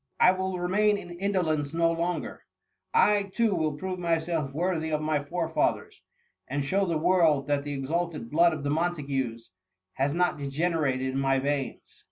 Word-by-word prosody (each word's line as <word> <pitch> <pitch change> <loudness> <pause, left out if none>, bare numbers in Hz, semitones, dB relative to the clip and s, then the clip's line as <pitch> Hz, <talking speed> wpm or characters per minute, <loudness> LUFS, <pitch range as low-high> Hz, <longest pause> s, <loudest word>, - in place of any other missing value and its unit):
I - - +7
will 190 0 -2
remain 205 +4 +2
in 175 -3 -9
indolence 175 -5 -1
no 165 0 +3
longer. 170 +2 -3 0.5
I, 210 - +3
too, 230 -3 +2
will 155 -4 0
prove 185 +4 -5
myself 165 -4 -1
worthy 160 +1 -1
of 155 -1 0
my 155 -1 0
forefathers, 165 +1 -1 0.5
and 140 +1 -2
show 195 +6 +1
the 165 -2 0
world 160 -4 +3
that 145 -1 +1
the 145 0 -4
exalted 150 -2 -3
blood 170 +3 +5
of 155 -2 -4
th6 145 - -1
Montagues 140 - -2 0.4
has 135 +2 0
not 175 -1 +1
degenerated 140 -2 0
in 135 - -1
my 135 0 +2
veins 140 0 -3
160 Hz, 165 wpm, -27 LUFS, 145-180 Hz, 0.5 s, I